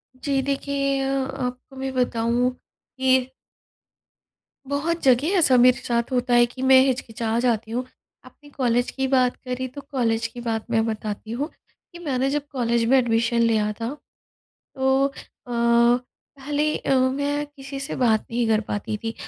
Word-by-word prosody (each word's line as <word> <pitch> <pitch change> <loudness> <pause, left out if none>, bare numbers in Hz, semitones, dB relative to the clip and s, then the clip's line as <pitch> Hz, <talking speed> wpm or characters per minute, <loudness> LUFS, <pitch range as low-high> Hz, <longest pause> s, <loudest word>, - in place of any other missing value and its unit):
जी 270 +1 -1
देखिए 275 0 -1
अ, 270 0 -1
आपको 250 +1 -5
मैं 265 0 -4
बताऊँ 245 0 +1
कि 260 0 -1 1.4
बहुत 325 +4 -1
जगह 260 +2 +4
ऐसा 275 -7 +5
मेरे 250 +1 +6
साथ 235 +1 -1
होता 250 -1 0
है 240 0 +6
कि 250 +2 -10
मैं 260 - +9
हिचकिचा 230 -3 -1
जाती 225 -2 0
हूँ। 245 +2 -1 0.4
आपने 290 -1 -17
कॉलेज 245 -2 +1
की 265 - 0
बात 255 -1 +3
करी 255 0 -5
तो 285 - -5
कॉलेज 230 -4 0
की 240 - -7
बात 225 -1 -1
मैं 225 -1 +2
बताती 215 0 -4
हूँ, 275 +6 -2 0.5
कि 345 - -10
मैंने 270 -5 -1
जब 290 0 -2
कॉलेज 235 -3 0
में 265 - +6
एडमिशन 235 -1 +1
लिया 220 -2 +2
था 230 - -2 0.9
तो 265 +1 +2
अ, 275 - -5 0.4
पहले 245 +5 0
अ, - - 0
मैं 285 +3 0
किसी 275 -1 -9
से 275 - -4
बात 225 -4 +2
नहीं 235 0 0
कर 220 -1 +3
पाती 210 +1 -2
थी। 225 - -3
255 Hz, 160 wpm, -23 LUFS, 235-270 Hz, 1.4 s, मैं